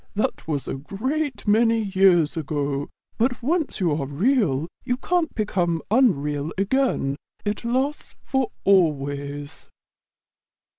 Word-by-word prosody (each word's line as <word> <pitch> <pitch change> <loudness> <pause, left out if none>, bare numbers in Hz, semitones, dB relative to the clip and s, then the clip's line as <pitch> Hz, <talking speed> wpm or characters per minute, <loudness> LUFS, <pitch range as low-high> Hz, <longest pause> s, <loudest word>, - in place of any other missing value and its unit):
"That 210 - -1
was 145 -4 -2
a - - -2
great 250 - -3
many 225 +1 +4
years 190 -5 +3
ago; 145 -2 -2 0.3
but 245 +1 +1
once 315 0 0
you 175 -4 +2
are 145 -2 -1
Real 165 - +1 0.2
you 245 -1 -1
can't 345 +2 0
become 175 -6 0
unreal 150 - +2
again. 200 - +1 0.3
It 205 +2 -2
lasts 260 +5 -1
for 265 -2 0
always." 145 -5 0
195 Hz, 115 wpm, -24 LUFS, -, 0.3 s, many